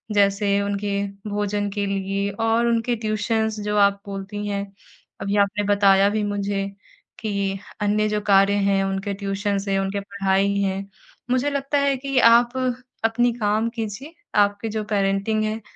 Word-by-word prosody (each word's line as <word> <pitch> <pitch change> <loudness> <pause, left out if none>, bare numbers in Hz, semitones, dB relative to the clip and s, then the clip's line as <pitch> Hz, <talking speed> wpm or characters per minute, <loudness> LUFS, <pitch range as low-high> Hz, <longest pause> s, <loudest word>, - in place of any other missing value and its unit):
जैसे 200 0 +3
उनके 200 0 -2 0.4
भोजन 205 0 -1
के 205 -1 -1
लिए 195 0 -1
और 225 +3 +1
उनके 235 +1 +1
ट्यूशंस 220 0 -1
जो 210 0 0
आप 200 0 -5
बोलती 200 +1 -5
हैं, 200 -1 -2 0.6
अभी 200 +1 -1
आपने 205 +1 +2
बताया 195 0 +5
भी 215 +1 -1
मुझे 200 -1 -2 0.5
कि 200 -2 -2 0.2
अन्य 210 +1 +2
जो 210 0 -1
कार्य 200 -1 +4
हैं, 200 -1 +2
उनके 195 +1 -2
ट्यूशंस 200 0 -2
हैं, 195 0 +1
उनकी 195 +1 -1
पढ़ाई 200 0 0
है। 195 0 -1 0.5
मुझे 255 +3 +2
लगता 280 0 -1
है 280 -1 +2
कि 275 0 -3
आप 235 0 +6 0.5
अपनी 240 +2 +2
काम 215 -1 0
कीजिए, 230 +6 -6 0.2
आपकी 205 +1 +2
जो 215 0 -3
पेरेंटिंग 200 +1 0
है, 215 +1 -2
205 Hz, 150 wpm, -23 LUFS, 200-220 Hz, 0.6 s, आप